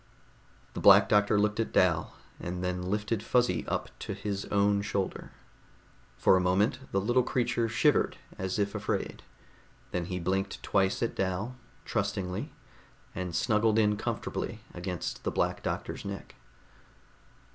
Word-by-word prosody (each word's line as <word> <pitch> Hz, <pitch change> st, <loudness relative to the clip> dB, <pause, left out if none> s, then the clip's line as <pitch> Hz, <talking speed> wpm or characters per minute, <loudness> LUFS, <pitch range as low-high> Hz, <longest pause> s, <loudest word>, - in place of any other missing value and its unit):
The -, -, -4 dB
Black -, -, +8 dB
Doctor 105 Hz, 0 st, +4 dB
looked 105 Hz, +1 st, +1 dB
at 115 Hz, -, 0 dB
Dal, 85 Hz, -4 st, +2 dB, 0.2 s
and 90 Hz, +1 st, -4 dB
then 90 Hz, 0 st, -1 dB
lifted 105 Hz, +3 st, -1 dB
Fuzzy 125 Hz, +2 st, +1 dB
up -, -, -2 dB
to 100 Hz, -, -4 dB
his 100 Hz, 0 st, -3 dB
own 100 Hz, 0 st, +2 dB
shoulder. 100 Hz, -2 st, -3 dB, 0.9 s
For -, -, +5 dB
a 90 Hz, -, +3 dB
moment 100 Hz, +7 st, +2 dB
the 95 Hz, -, +2 dB
little 120 Hz, +6 st, +3 dB
creature 120 Hz, -2 st, 0 dB
shivered 120 Hz, +6 st, +2 dB, 0.2 s
as 95 Hz, +1 st, -3 dB
if 100 Hz, -1 st, 0 dB
afraid. -, -, -2 dB, 0.7 s
Then 90 Hz, -1 st, -1 dB
he 90 Hz, +1 st, -3 dB
blinked 95 Hz, +3 st, -2 dB
twice 95 Hz, +3 st, +1 dB
at 115 Hz, -, 0 dB
Dal, 95 Hz, +6 st, -2 dB, 0.3 s
trustingly, 100 Hz, -4 st, -2 dB, 0.6 s
and 90 Hz, -2 st, -4 dB
snuggled 110 Hz, -1 st, +2 dB
in 105 Hz, -1 st, +4 dB
comfortably -, -, -3 dB
against 90 Hz, 0 st, -4 dB
the -, -, 0 dB
Black -, -, 0 dB
Doctor's -, -, -4 dB
neck. 100 Hz, 0 st, -7 dB
100 Hz, 140 wpm, -29 LUFS, 95-105 Hz, 0.9 s, Black